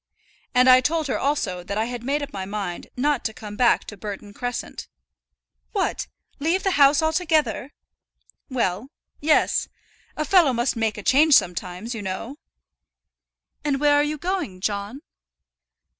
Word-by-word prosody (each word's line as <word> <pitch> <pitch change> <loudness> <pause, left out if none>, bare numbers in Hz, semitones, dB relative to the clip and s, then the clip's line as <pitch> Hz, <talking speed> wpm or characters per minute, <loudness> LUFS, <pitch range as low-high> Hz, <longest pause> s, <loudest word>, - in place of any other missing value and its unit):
"And 250 +1 +5
I 255 0 +8
told 315 +4 0
her 270 - -1
also 210 -11 -1
that 200 +3 -4
I 220 - +1
had 245 0 -5
made 285 +3 -1
up 285 - -8
my 190 - -4
mind 195 -3 -5
not 285 0 +1
to 220 - -2
come 210 -1 -8
back 240 +1 +3
to 210 - -8
Burton 205 0 -7
Crescent." 245 +2 -5 0.9
"What! 395 -3 -1 0.3
leave 330 +6 0
the 385 - +2
house 285 -1 +5
altogether!" 310 - +1 0.8
"Well; 235 -2 -1 0.3
yes. 305 +1 +2 0.5
A 305 - -1
fellow 335 -6 +5
must 240 +2 0
make 225 -2 -1
a 210 - -7
change 290 +5 +5
sometimes, 180 - 0
you 225 - -5
know." 205 +8 -5 1.3
"And 285 -2 0
where 290 0 +4
are 290 - +5
you 300 +1 -2
going, 345 - -3
John?" 205 +6 -3
255 Hz, 155 wpm, -23 LUFS, 210-295 Hz, 1.3 s, I